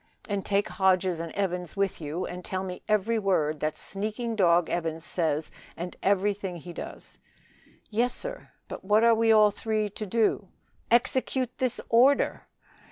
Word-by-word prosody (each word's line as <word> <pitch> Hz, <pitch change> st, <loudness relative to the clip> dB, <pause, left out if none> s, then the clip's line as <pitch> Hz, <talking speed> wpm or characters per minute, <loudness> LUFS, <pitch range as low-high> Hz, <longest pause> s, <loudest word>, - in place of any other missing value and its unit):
"And 200 Hz, -2 st, -2 dB
take 200 Hz, +1 st, +1 dB
Hodges 185 Hz, -3 st, +2 dB
and 165 Hz, -1 st, -5 dB
Evans 180 Hz, -4 st, -2 dB
with 195 Hz, -3 st, -1 dB
you, 155 Hz, +4 st, -3 dB
and 180 Hz, 0 st, -7 dB
tell 185 Hz, +1 st, -3 dB
me 180 Hz, -1 st, -6 dB
every 215 Hz, +2 st, +2 dB
word 155 Hz, -7 st, +1 dB
that 155 Hz, +1 st, -2 dB
sneaking 215 Hz, +3 st, -4 dB
dog, 175 Hz, -4 st, +4 dB
Evans, 165 Hz, -1 st, -3 dB
says 160 Hz, -3 st, -1 dB, 0.3 s
and 175 Hz, +1 st, -5 dB
everything 195 Hz, -1 st, 0 dB
he 175 Hz, +1 st, -9 dB
does." -, -, -9 dB, 0.7 s
"Yes, 240 Hz, +3 st, +2 dB
sir. -, -, -4 dB, 0.2 s
But -, -, -8 dB
what 210 Hz, +3 st, +3 dB
are 235 Hz, 0 st, +6 dB
we 225 Hz, 0 st, +3 dB
all 215 Hz, -1 st, +6 dB
three 215 Hz, 0 st, -1 dB
to 215 Hz, -, -5 dB
do?" 215 Hz, -1 st, +1 dB, 0.4 s
"Execute 255 Hz, +1 st, +1 dB
this 255 Hz, -3 st, -1 dB
order!" 255 Hz, +5 st, +3 dB
195 Hz, 160 wpm, -27 LUFS, 175-220 Hz, 0.7 s, are